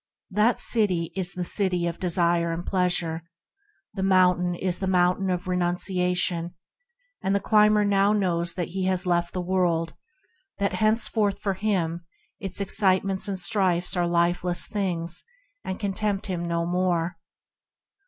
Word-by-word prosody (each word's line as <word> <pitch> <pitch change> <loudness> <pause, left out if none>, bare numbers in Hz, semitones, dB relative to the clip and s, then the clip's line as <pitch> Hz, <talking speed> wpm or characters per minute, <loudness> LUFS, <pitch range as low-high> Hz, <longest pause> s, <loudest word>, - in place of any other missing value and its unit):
That 210 +5 +2
city 185 -7 +1
is 185 -2 +1
the 180 - -3
City 180 -1 +1
of 170 -1 -4
Desire 170 -2 +1
and 170 +2 -5
Pleasure, 175 -3 0 0.7
the 195 - -5
mountain 180 -2 +3
is 180 0 -2
the 190 - -2
Mountain 185 +1 +2
of 180 +1 -2
Renunciation, 180 -1 0 0.7
and 195 +1 0
the - - +2
climber 210 0 +3
now 200 0 +3
knows 175 -5 0
that 175 -2 -3
he 190 +1 -3
has 185 0 0
left 175 -1 0
the 185 - -3
world, 175 -3 0 0.6
that 200 -1 -1
henceforth 215 -2 +2
for 195 - -2
him 180 -4 -2 0.4
its 195 -1 -3
excitements 195 0 +2
and 195 -1 -3
strifes 185 -2 +1
are 175 -1 +1
lifeless 175 +1 0
things, 175 -5 -2 0.4
and 190 - -5
can 200 -2 -2
tempt 200 -1 -2
him 180 -3 -3
no 170 0 -1
more. 175 -1 -1
180 Hz, 145 wpm, -25 LUFS, 175-195 Hz, 0.7 s, mountain